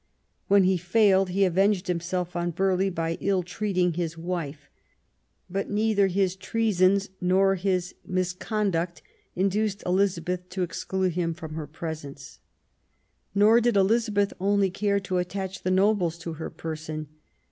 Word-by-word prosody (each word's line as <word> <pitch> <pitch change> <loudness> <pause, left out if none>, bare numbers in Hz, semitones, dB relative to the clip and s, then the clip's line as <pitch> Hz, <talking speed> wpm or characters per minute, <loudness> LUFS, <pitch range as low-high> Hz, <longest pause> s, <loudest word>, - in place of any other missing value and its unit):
When 200 0 +5
he 185 0 +3
failed 190 +1 +3
he 195 +2 +2
avenged 190 +1 +2
himself 180 0 -2
on 175 0 -1
Burghley 190 +2 +1
by 165 -2 -2
ill 195 -1 +1
treating 180 -1 0
his 165 -1 -3
wife; 165 -4 -4 0.8
but 195 +2 -3
neither 210 -1 +2
his 190 -1 +1
treasons 200 -2 +1
nor 190 +2 +3
his 185 -1 -1
misconduct 180 -1 -2 0.3
induced 200 +2 0
Elizabeth 180 -1 0
to 185 0 -2
exclude 185 +2 -1
him 170 -1 -1
from 160 -2 -8
her 155 -1 -5
presence. 150 -3 -7 1.0
Nor 215 +4 +6
did 235 -3 +2
Elizabeth 205 0 +2
only 200 0 +2
care 200 +1 +1
to 185 -1 -1
attach 190 +1 -4
the 185 - -1
nobles 185 -3 +2
to 170 -1 -6
her 160 0 -6
person. 155 -1 -6
185 Hz, 135 wpm, -26 LUFS, 175-200 Hz, 1.0 s, Nor